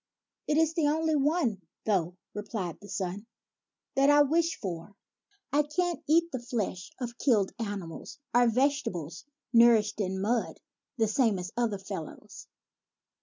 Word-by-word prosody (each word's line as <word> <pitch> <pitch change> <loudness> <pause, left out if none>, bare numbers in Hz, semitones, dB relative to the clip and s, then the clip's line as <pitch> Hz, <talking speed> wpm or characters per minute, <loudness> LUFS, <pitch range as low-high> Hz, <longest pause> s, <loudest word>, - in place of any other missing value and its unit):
" - - -59
It 300 - +2
is 320 0 +3
the 325 -3 +2
only 315 +1 +1
one, 285 - +1 0.2
though," 180 -4 0 0.2
replied 205 -5 -4
his 205 - -7
son, 195 +3 -4 0.3
" - - -61
that 275 +1 +4
I 290 0 +7
wish 325 +3 +1
for. 190 0 -6 0.6
I 295 - +5
can't 340 +4 -1
eat 335 +3 +3
the 255 - -3
flesh 215 -7 -3
of 240 -1 -5
killed 215 -8 +3
animals 200 -7 -5 0.2
or 245 0 +5
vegetables 215 - -1 0.3
nourished 225 -3 +5
in 190 -1 -2
mud, 225 +4 -1 0.4
the 225 -2 +2
same 220 -1 +2
as 180 0 -5
other 235 -4 0
fellows. 190 -5 -8
230 Hz, 150 wpm, -29 LUFS, 195-290 Hz, 0.6 s, I